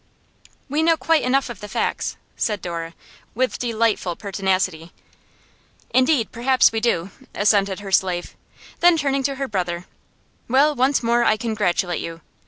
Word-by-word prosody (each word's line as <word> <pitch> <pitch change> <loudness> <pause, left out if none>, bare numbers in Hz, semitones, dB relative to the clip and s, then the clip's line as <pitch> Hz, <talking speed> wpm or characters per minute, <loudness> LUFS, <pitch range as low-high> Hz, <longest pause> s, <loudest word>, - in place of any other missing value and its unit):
'We 295 +2 0
know 330 0 +3
quite 325 -1 +2
enough 265 +2 +1
of 240 -6 -8
the 210 - -8
facts,' - - -2 0.2
said 210 -2 -1
Dora, 165 -2 -5 0.4
with 255 +2 0
delightful 225 -6 0
pertinacity. 190 -4 -2 1.0
'Indeed, 255 -2 +2
perhaps 255 +2 +3
we 225 - -1
do,' 200 -5 0 0.2
assented 200 -1 +2
her 195 -1 -7
slave. 180 -2 0 0.4
Then, 345 -1 +5
turning 275 -2 0
to 275 +1 -1
her 275 0 -3
brother, 180 -4 -3 0.6
'Well, 280 +5 +4
once 265 0 +1
more 235 +1 +2
I 215 - +3
congratulate 195 -6 -1
you. 165 0 -7
220 Hz, 145 wpm, -22 LUFS, 185-265 Hz, 1.0 s, Then